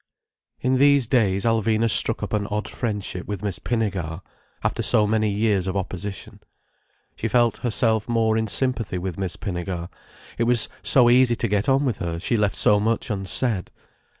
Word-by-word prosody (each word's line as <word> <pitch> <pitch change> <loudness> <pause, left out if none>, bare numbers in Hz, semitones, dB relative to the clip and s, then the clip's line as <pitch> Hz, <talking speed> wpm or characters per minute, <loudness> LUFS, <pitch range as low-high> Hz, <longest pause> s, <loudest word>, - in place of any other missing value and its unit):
In 130 +1 +1
these 140 -2 +4
days 105 -5 +1
Alvina 115 0 +1
struck 105 - +2
up - - -5
an 105 -1 -1
odd 105 0 -3
friendship 105 -5 -4
with 105 -1 -5
Miss 100 -3 -3
Pinnegar, 95 -8 -3 0.4
after - - -1
so 105 - +2
many 110 0 +1
years 100 -2 0
of 95 +1 -2
opposition. 95 +1 -6 0.8
She 115 - -3
felt 120 0 +2
herself 110 -1 0
more 115 -2 +1
in 110 0 0
sympathy 115 -3 +1
with 90 -1 -5
Miss 95 -3 -1
Pinnegar—it 90 +3 -6
was 120 -1 +2
so 125 -3 +4
easy 120 0 +4
to 115 - -2
get 105 +2 0
on 135 +2 +2
with 125 -6 -2
her, 85 -1 -3
she 95 +8 -1
left 105 -3 +1
so 105 - +3
much 115 +2 -1
unsaid. 100 +1 0
110 Hz, 170 wpm, -23 LUFS, 95-115 Hz, 0.8 s, these